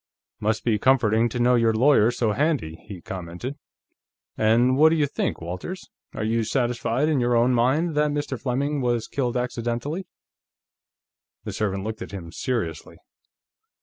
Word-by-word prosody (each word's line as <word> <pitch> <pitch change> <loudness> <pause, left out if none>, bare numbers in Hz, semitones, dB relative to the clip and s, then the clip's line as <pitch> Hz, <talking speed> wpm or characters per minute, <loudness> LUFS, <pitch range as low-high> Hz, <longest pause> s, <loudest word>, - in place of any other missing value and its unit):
"Must 110 +1 0
be 110 -3 +1
comforting 120 -3 +3
to 120 - -5
know 120 +1 +3
your 115 -2 +3
lawyer's 120 -2 +4
so 115 -3 +1
handy," 135 - -1
he 95 -4 -8
commented. 90 +9 -6 0.8
"And 120 +4 +3
what 155 +3 +6
do 165 - +2
you 150 -2 +2
think, 140 - -2
Walters? 90 - -6 0.2
Are - - -3
you 115 +1 +1
satisfied, 125 +3 0
in 155 -4 +2
your 120 0 +2
own 120 +2 +3
mind, 135 +8 +2
that 150 0 +2
Mr. 145 -5 -3
Fleming 140 +3 -1
was 120 -2 0
killed 125 -3 -1
accidentally?" 125 +7 -3 1.4
The - - -5
servant 100 -2 -2
looked 110 +1 -5
at 115 - -7
him 85 -4 -7
seriously. 95 -8 -3
120 Hz, 155 wpm, -24 LUFS, 110-135 Hz, 1.4 s, what